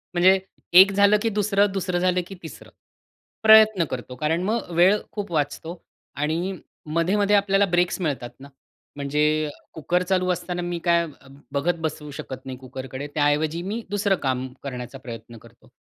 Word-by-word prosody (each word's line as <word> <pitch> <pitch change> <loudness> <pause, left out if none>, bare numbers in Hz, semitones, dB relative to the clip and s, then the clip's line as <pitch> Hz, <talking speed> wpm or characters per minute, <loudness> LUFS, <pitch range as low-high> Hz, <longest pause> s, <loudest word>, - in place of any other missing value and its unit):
म्हणजे 190 +2 +5 0.3
एक 190 +2 +9
झालं, 200 +1 +4
की 225 - +1
दुसरं. 205 -1 +1
दुसरं 185 -2 -1
झालं, 180 0 +1
की 195 - -9
तिसरं 160 - -10 0.7
प्रयत्न 220 -5 +7
करतो. 125 0 -6
कारण 160 +6 -1
मग 215 -3 -2
वेळ 185 +5 +5
खूप 205 -4 -5
वाचतो 160 +3 -3 0.3
आणि 165 +6 -1 0.3
मधे-मधे 190 +6 +1
आपल्याला 200 0 +3
ब्रेक्स 175 0 +1
मिळतात 135 -7 -2
ना. 140 +1 -12 0.5
म्हणजे 150 +2 0 0.2
कुकर 175 +3 0
चालू 185 0 0
असताना 175 0 -3
मी 175 -1 -3
काय 170 0 +3 0.5
बघत 165 +5 +1
बसू 155 -2 -4
शकत 135 -1 -8
नाही 130 -1 -6
कुकरकडे. 130 +2 -7
त्याऐवजी 150 +3 +1
मी 230 +2 -3
दुसरं 200 -1 +1
काम 130 0 -1 0.2
करण्याचा 125 -1 -6
प्रयत्न 115 -2 -10
करतो. 115 +2 -19
170 Hz, 150 wpm, -23 LUFS, 145-195 Hz, 0.7 s, एक